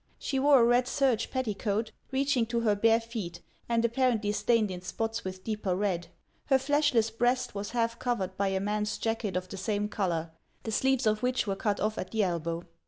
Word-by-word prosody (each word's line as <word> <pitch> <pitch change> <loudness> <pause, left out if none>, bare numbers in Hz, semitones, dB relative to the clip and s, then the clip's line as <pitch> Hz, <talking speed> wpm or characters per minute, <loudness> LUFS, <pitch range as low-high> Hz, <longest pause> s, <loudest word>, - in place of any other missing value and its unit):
She 270 - -2
wore 280 0 +6
a - - +6
red 245 +1 +3
serge 250 -4 +1
petticoat, 220 -3 -1 0.2
reaching 265 -3 +1
to 235 0 0
her 215 -3 +3
bare 225 +2 +4
feet, 225 -7 -6 0.3
and 235 0 +2
apparently 235 -3 +1
stained 210 0 +2
in 180 -1 -6
spots 225 +5 -3
with 185 0 -6
deeper 210 -4 -1
red. 185 -3 -1 0.4
Her 270 - +4
fleshless 265 -5 +2
breast 245 +3 0
was 200 0 -4
half 230 -1 -1
covered 195 -7 -1
by 200 +1 0
a 190 0 0
man's 210 +1 -1
jacket 225 -4 -2
of 185 0 -4
the 195 - -8
same 205 +1 -1
color, 170 -6 -1 0.3
the 220 - -4
sleeves 265 +2 +2
of 215 0 +2
which 250 0 +1
were 195 -2 -1
cut 205 +1 -1
off 215 +1 -1
at 185 - -4
the 220 -2 +1
elbow. 170 -2 -2
220 Hz, 200 wpm, -29 LUFS, 200-240 Hz, 0.4 s, wore